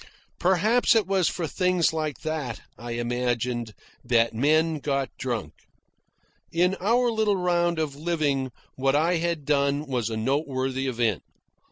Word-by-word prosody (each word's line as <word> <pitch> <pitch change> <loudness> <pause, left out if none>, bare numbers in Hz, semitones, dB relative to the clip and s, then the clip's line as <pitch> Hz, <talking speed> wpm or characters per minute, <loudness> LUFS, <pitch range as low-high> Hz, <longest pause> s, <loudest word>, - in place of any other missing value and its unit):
Perhaps 210 +7 +3
it 220 -3 +3
was 190 -2 +2
for 175 - -3
things 180 0 +1
like 155 -3 -3
that, 155 -7 -3
I 120 0 -6
imagined, 120 -1 -2 0.3
that 115 -2 +2
men 155 +6 +2
got 140 -2 -1
drunk. 120 -3 -3 1.0
In 180 +3 +2
our 235 +5 +2
little 220 -2 +2
round 175 -1 +1
of 155 -3 -2
living 145 -4 0 0.2
what 135 +1 +1
I 165 +4 +2
had 165 -3 -2
done 140 0 +1
was 125 -5 -2
a 110 - -3
noteworthy 135 +1 -1
event. 115 -5 0
145 Hz, 140 wpm, -26 LUFS, 125-175 Hz, 1.0 s, Perhaps